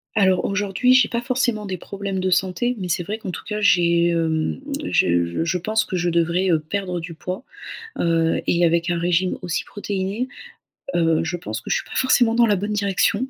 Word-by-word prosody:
Alors, 190 -3 +3
aujourd'hui, 205 +5 +2
j'ai 255 -4 +5
pas 235 - -1
forcément 240 -3 -1
des 190 -1 -3
problèmes 200 +2 -5
de 185 0 0
santé. 190 +7 +1
Mais 185 -2 -4
c'est 175 +1 0
vrai 210 +5 -4
qu'en 210 -4 -6
tout 175 - -7
cas, 210 -1 -3
j'ai 170 -4 +4
hem, 160 +1 0 0.2
je 85 - +1
je 170 +2 0
pense 215 +4 0
que 185 - -4
je 175 0 0
devrais, 170 +3 +1
heu, 165 - +4
perdre 180 +3 -3
du 165 0 -7
poids, 180 +8 -6 0.6
heu 165 -1 +1
et 175 0 +3
avec 170 +1 +1
un 175 -1 0
régime 175 +2 +1
aussi 175 -2 -2
protéiné, 200 +3 -3 0.7
heu, 165 -2 +2
je 165 +2 -2
pense 120 -10 -5
que - - -11
je - - +3
suis - - -3
pas - - -9
forcément 245 -3 +3
dans 235 0 +5
la 205 -2 +3
bonne 205 +3 -3
direction. 205 +3 +1
185 Hz, 210 wpm, -22 LUFS, 170-210 Hz, 0.7 s, j'ai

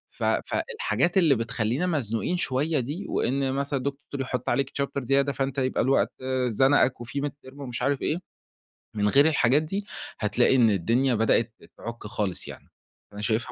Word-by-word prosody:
ف - - -6
فالحاجات 435 - 0
اللي 160 -7 +5
بتخلّينا 115 +7 -1
مزنوقين 140 - -1
شوية 150 0 0
دي 150 +11 -4
وإن 135 +1 0
مثلًا 140 0 -1
دكتور 140 0 -5
يحط 125 -1 -3
عليك 140 -1 0
chapter 140 0 -2
زيادة 135 +3 +2
فأنت 135 0 -2
يبقى 130 -1 +1
الوقت 135 +1 +2 0.4
زنقك 130 +1 +3
وفي 135 +4 -4
midterm 140 -2 -6
ومش 125 -4 -5
عارف 140 0 0
إيه، 155 - 0 0.8
من 105 -1 +1
غير 140 +7 +6
الحاجات 145 -2 +3
دي 195 +6 -4 0.3
هتلاقي 120 +4 +3
إن 120 -4 +5
الدنيا 115 +7 +2
بدأت 115 +1 +2 0.2
تعُك 115 -2 -7
خالص 105 -4 -3
يعني. - - -11 0.4
فأنا 105 - -8
شايفها 110 +3 -1
135 Hz, 160 wpm, -26 LUFS, 115-145 Hz, 0.8 s, غير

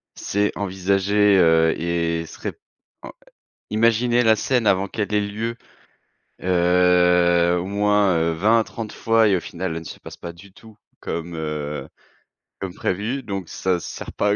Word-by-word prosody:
c'est 105 +1 -1
envisager, 100 +1 +2
heu 80 -2 +4
et 85 -1 -1
se - - -13
ré - - -2 0.6
heu, - - -8 0.6
imaginer 115 +2 +2
la 110 -1 +5
scène 120 0 0
avant 95 0 +2
qu'elle 105 -1 -3
ait 105 - +3
lieu, 110 +3 -4 0.9
heu, 90 -1 +3
au 90 - -4
moins, 100 -2 +2
heu, 80 0 +1
20 110 +8 +3
à - - -1
30 110 -1 -7
fois 115 0 +2
et 95 - +3
au - - -2
final, 95 0 -5
elle 80 - -4
ne - - -12
se - - -9
passe - - -11
pas 85 - -8
du 95 +3 -16
tout, 110 0 -17 0.2
comme, 85 0 -5
heu, 75 -2 -4 0.7
comme 95 -2 -5
prévue. 115 +8 -2
Donc 95 -5 -5
ça 95 -2 -1
sert - - -8
pas 105 - 0
à 100 - +2
95 Hz, 170 wpm, -22 LUFS, 85-105 Hz, 0.9 s, la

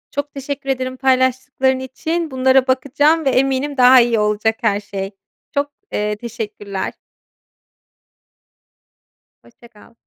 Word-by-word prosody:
Çok 285 +1 -3
teşekkür 275 0 -6
ederim 255 -1 -2
paylaştıkların 260 0 +1
için, 315 +5 -3
bunlara 260 0 +3
bakacağım 290 +5 +2
ve 270 - +4
eminim 270 +2 0
daha 255 0 +8
iyi 235 -2 +1
olacak 210 +1 +1
her 200 0 +1
şey. 200 -1 -6 0.4
Çok, 285 0 -1 0.2
eee, 210 0 -1
teşekkürler. 210 -3 -5 2.5
Hoşça 235 0 -19
kal. 225 +1 -20
260 Hz, 115 wpm, -19 LUFS, 225-270 Hz, 2.5 s, daha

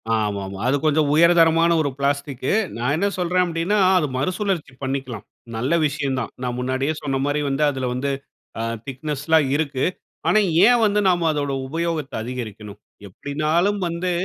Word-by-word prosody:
ஆமாமா. 100 -3 -2
அது 135 - +3
கொஞ்சம் 155 -1 +3
உயர்தரமான 165 0 +5
ஒரு 145 - 0
பிளாஸ்டிக்கு. 140 -2 -1 0.3
நா 120 - -4
என்ன 200 +5 +1
சொல்றேன் 180 +1 +2
அப்டீன்னா, 170 +5 0 0.2
அது 155 -4 +1
மறுசுழற்சி 185 -1 -2
பண்ணிக்கலாம். 130 -5 -4 0.3
நல்ல 125 +7 -1
விஷயந்தான். 135 -4 -2
நா - - -1
முன்னாடியே 130 +4 -1
சொன்ன 135 -2 -1
மாரி 145 +1 0
வந்து 135 +2 0
அதுல 130 -2 -3
வந்து 135 +3 -1 0.5
அ - - -1 0.2
திக்னெஸ்லாம் 150 +2 0
இருக்கு. 140 -4 -1 0.4
ஆனா 215 - +5 0.3
ஏன் 245 -1 +5
வந்து 210 0 +2
நாம 175 -2 +2
அதோட 145 -2 -2
உபயோகத்த 160 0 -3
அதிகரிக்கணும்? 110 -4 -7 0.3
எப்டின்னாலும் 155 - 0
வந்து 170 +2 -2
145 Hz, 145 wpm, -22 LUFS, 130-170 Hz, 0.5 s, உயர்தரமான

